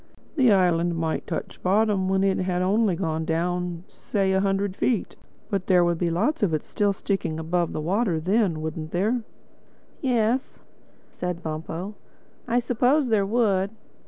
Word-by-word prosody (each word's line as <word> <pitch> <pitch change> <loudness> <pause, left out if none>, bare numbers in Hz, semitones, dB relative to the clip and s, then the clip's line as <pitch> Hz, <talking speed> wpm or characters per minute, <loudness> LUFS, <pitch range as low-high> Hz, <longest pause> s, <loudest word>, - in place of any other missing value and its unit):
The 255 -7 +5
island 175 -3 +3
might 160 -1 -2
touch - - -5
bottom 200 0 +2
when 190 0 +2
it 195 -1 +2
had 180 -1 0
only 200 0 +2
gone 160 -2 -2
down, 175 +1 -2
say, 195 -2 -1
a 190 - +3
hundred 195 0 0
feet. 230 -2 0 0.4
But 195 -2 -1
there 180 -2 +5
would 170 -1 0
be 175 - +1
lots 215 - 0
of 180 -7 +2
it 155 - -3
still 205 -1 0
sticking 195 -3 -2
up 160 - -5
above 170 0 0
the - - -3
water 185 +1 +1
then, 185 -2 +1
wouldn't 155 0 -5
there?" 215 +7 +1 0.8
"Yes," 245 -1 0 0.5
said 180 -1 -4
Bumpo, 160 +5 -5 0.5
"I 235 +1 +1
suppose 250 +3 +2
there 205 -3 +2
would. 200 -4 +2
190 Hz, 160 wpm, -25 LUFS, 170-215 Hz, 0.8 s, The